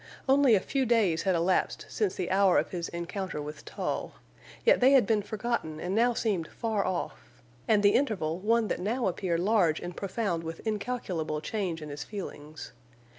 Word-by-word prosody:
Only 270 -3 +5
a - - +3
few 265 +6 -1
days 210 -8 +3
had 190 -2 +1
elapsed 175 +2 0
since 420 -3 -1
the 185 -1 -3
hour 195 -1 +4
of - - 0
his 170 -2 -3
encounter 175 0 -4
with 150 +1 -7
Tull, - - -3 0.5
yet - - +6
they 260 +2 +6
had 265 -6 +6
been 215 0 +2
forgotten 210 -7 -3
and 180 +3 -3
now 235 +3 +3
seemed 195 -9 -1
far 220 -4 -2
off, 175 -9 -5 0.2
and 210 -2 +3
the 205 - +5
interval 185 - 0
one 225 +3 +2
that - - -1
now 230 +7 -1
appeared 175 -2 -1
large 185 -6 +3
and 175 0 -7
profound 195 -4 -2
with 165 0 -6
incalculable 200 -8 -2
change 175 -3 -3
in 150 - -7
his 145 0 -5
feelings. 155 -7 -8
195 Hz, 180 wpm, -29 LUFS, 170-225 Hz, 0.5 s, yet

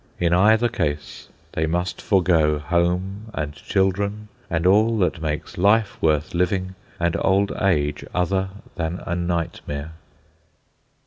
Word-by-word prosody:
In 85 -1 +2
either 110 +6 +5
case 75 -10 -3 0.2
they 80 0 -1
must 90 +3 -2
forego 85 -6 +3
home 90 +6 -1
and 75 -2 -3
children 100 +6 -1 0.2
and 85 0 -1
all 110 +4 +4
that 90 -4 0
makes 75 +1 -4
life 105 +2 +3
worth 75 -1 +1
living 95 +1 0 0.3
and 85 -1 +1
old 100 +1 +2
age 75 -7 +1
other 95 +2 0 0.2
than 85 +1 -3
a 85 - -2
nightmare. 85 -4 -3
90 Hz, 125 wpm, -23 LUFS, 80-95 Hz, 0.3 s, either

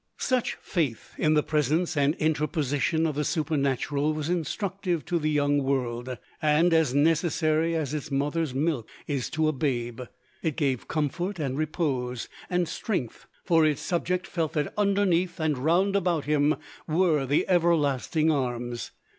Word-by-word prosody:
Such 255 -2 0
faith 150 - -3
in 155 0 +3
the 150 - +3
presence 155 +4 +1
and 145 +2 +2
interposition 155 0 0
of 155 - 0
the 150 +2 -1
Supernatural 145 -1 0
was 155 +1 -3
instructive 180 0 -2
to 175 - 0
the 155 0 0
young 145 -1 +2
world, 125 -2 -2 0.2
and 155 +3 +3
as 160 -5 +3
necessary 160 +1 +2
as 150 -3 -2
its 150 0 -4
mother's 145 +2 0
milk 135 -3 -1 0.2
is 140 -4 -2
to 160 -2 +1
a - - +3
babe. 120 -4 -2 0.4
It 160 -4 -1
gave 135 -6 0
comfort 170 +6 -2
and 135 -5 -2
repose 135 -5 -2 0.2
and 180 -1 +1
strength, 165 - -3 0.2
for 165 -2 +4
its 150 -2 +1
subject 180 +1 -1
felt 165 -5 -2
that 150 -2 -1
"underneath 195 -4 +1
and 155 -2 +1
round 180 +8 +2
about 175 -6 +1
him 150 +1 +3 0.3
were 155 -4 +2
the 145 +3 +2
everlasting 160 -3 +2
arms." 120 -4 -2
155 Hz, 150 wpm, -27 LUFS, 140-170 Hz, 0.4 s, for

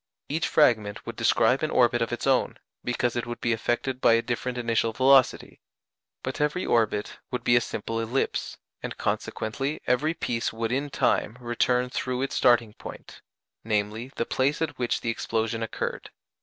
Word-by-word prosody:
Each 155 +3 0
fragment 110 -9 +2
would - - -6
describe - - +3
an - - 0
orbit - - +3
of - - 0
its - - -3
own, - - +2 0.3
because 125 0 0
it 120 - -2
would 120 0 -5
be 115 - +1
affected 120 +3 -1
by - - +6
a 115 0 +3
different 125 0 -3
initial 115 -1 0
velocity; 130 +1 +3 0.6
but - - -3
every 150 +5 0
orbit 110 -3 0
would 125 -2 -3
be 120 - +4
a 120 - +5
simple 115 0 -4
ellipse, 115 +4 -2 0.2
and - - -6
consequently 135 +7 -2
every 150 +6 +1
piece 115 -6 -1
would 115 0 -3
in 140 +3 -1
time 115 -4 +1
return 125 +1 0
through 130 0 -2
its 135 - -3
starting 120 -4 +3
point - - -11 0.4
viz. 110 +3 -1
the 115 - -1
place 140 +4 0
at 160 - -3
which 120 -1 0
the 115 - 0
explosion 115 0 -2
occurred. 115 - -4
120 Hz, 170 wpm, -26 LUFS, 115-130 Hz, 0.6 s, by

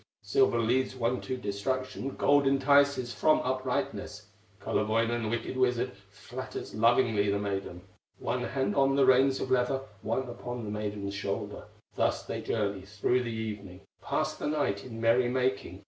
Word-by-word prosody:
Silver 405 0 +3
leads 125 +3 +1
one 125 0 0
to 130 - -4
destruction, 130 +5 -3
Gold 145 -1 +4
entices 140 -2 +3
from 155 +7 +3
uprightness. 130 0 -3 0.3
Kullerwoinen, 115 +1 0
wicked 120 +3 -3
wizard, 125 -1 +1 0.2
Flatters 125 +6 -7
lovingly 115 -2 +3
the 100 - +1
maiden, 95 -3 -4 0.3
One - - -2
hand 135 0 -1
on 135 0 +3
the 140 -1 +5
reins 130 +1 +4
of 130 - -3
leather, 130 +1 +2 0.2
One 125 +4 -1
upon 120 0 -6
the 105 - -4
maiden's 105 -1 -3
shoulder; 100 0 -4 0.3
Thus - - 0
they - - -4
journey 100 -3 -1
through 105 +6 0
the 120 - -3
evening, 105 -4 -6 0.2
Pass - - -1
the - - -4
night 100 -10 0
in 115 -3 -8
merry 120 +2 +3
making. 125 -8 -1
120 Hz, 150 wpm, -29 LUFS, 105-130 Hz, 0.3 s, the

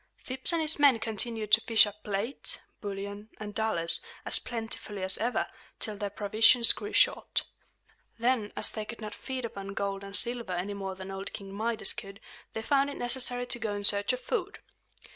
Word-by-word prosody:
Phips 260 +4 +3
and 335 -1 +1
his 310 0 +3
men 280 -4 +6
continued 220 -1 -3
to 220 +1 +7
fish 225 -1 +5
up 210 0 -9
plate, 210 +6 -3 0.2
bullion, 200 +1 -6
and 210 -1 -7
dollars, 205 -7 0 0.2
as - - +2
plentifully 225 -4 -6
as 190 0 +1
ever, 240 +3 0 0.3
till 215 -3 -2
their 205 0 -4
provisions 220 +4 +6
grew 415 - -7
short. - - +2 0.7
Then, 235 -3 0
as - - -2
they 215 - -4
could 230 +2 -9
not 215 -1 -7
feed 260 -2 -5
upon 200 -3 -7
gold 200 0 -3
and 195 0 -2
silver 235 -4 +2
any 180 +3 -3
more 195 -1 -5
than 190 +1 -8
old 195 +1 -6
King 195 -1 -8
Midas 220 +2 +1
could, 195 -3 -9 0.3
they 220 - -4
found 280 +2 +2
it 285 - -7
necessary 245 0 +1
to 245 -1 +3
go 215 -2 -2
in 205 - -5
search 200 +1 +4
of 255 0 -4
food. 410 -3 -3
220 Hz, 190 wpm, -29 LUFS, 200-245 Hz, 0.7 s, to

